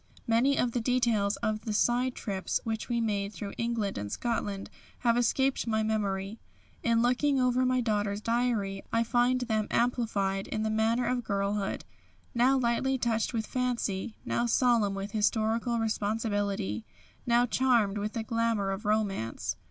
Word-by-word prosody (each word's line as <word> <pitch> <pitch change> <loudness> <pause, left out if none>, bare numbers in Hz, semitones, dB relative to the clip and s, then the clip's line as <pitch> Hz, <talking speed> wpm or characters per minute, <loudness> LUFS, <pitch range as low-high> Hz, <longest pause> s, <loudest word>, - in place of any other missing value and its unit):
Many 240 +5 +3
of 245 - +1
the 240 - -1
details 230 -4 +2
of 215 0 0
the 220 - -2
side 245 +4 +2
trips 195 -3 -2
which 225 +1 -3
we 235 -1 +1
made 205 -2 -1
through 205 -2 -6
England 230 -4 -1
and 100 0 -5
Scotland 205 -4 -3 0.3
have 235 -1 +3
escaped 260 +2 +1
my 220 -1 +1
memory. 205 -1 -2 0.4
In 230 0 +2
looking 265 +3 +2
over 255 0 +2
my 255 0 +2
daughter's 205 -3 0
diary 225 -4 0
I 230 - +2
find 245 +2 +2
them 220 -3 0
amplified 215 -5 0
in 215 - -2
the 220 - 0
manner 225 +3 +1
of 250 -1 0
girlhood, 200 -1 -1 0.5
now 255 +3 +4
lightly 260 +2 +1
touched 230 -3 0
with 225 -3 -2
fancy, 235 -5 -2
now 240 - 0
solemn 230 -4 +3
with 195 +1 -5
historical 225 +2 +1
responsibility, 205 - -1 0.4
now 240 0 +4
charmed 235 -5 +2
with 210 +1 -3
the 225 - -2
glamour 230 -3 0
of 195 +3 -5
romance. 205 - -1
225 Hz, 155 wpm, -29 LUFS, 205-240 Hz, 0.5 s, now